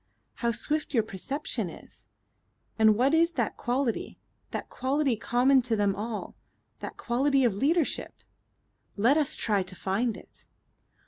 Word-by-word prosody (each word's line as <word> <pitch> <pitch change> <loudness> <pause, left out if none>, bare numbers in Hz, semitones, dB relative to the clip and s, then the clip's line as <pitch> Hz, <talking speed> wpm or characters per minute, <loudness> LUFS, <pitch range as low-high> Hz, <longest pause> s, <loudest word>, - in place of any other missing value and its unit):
"How 235 - 0
swift 300 +4 -1
your 225 - +4
perception 225 +8 -3
is! - - -13 0.7
And 220 -1 +6
what 265 +5 +3
is 335 +1 +4
that 240 -7 -1
quality 245 -1 -2 0.3
that - - -5
quality 270 0 0
common 250 +4 +3
to 235 -2 -1
them 205 -2 +1
all 215 +1 -5 0.4
that - - -7
quality 270 +3 +2
of 235 -5 +3
leadership? 295 - 0 0.8
Let 235 +8 +4
us 305 -3 +1
try 205 -3 +1
to 185 0 -7
find 210 +6 -1
it." - - -16
245 Hz, 140 wpm, -28 LUFS, 220-280 Hz, 0.8 s, And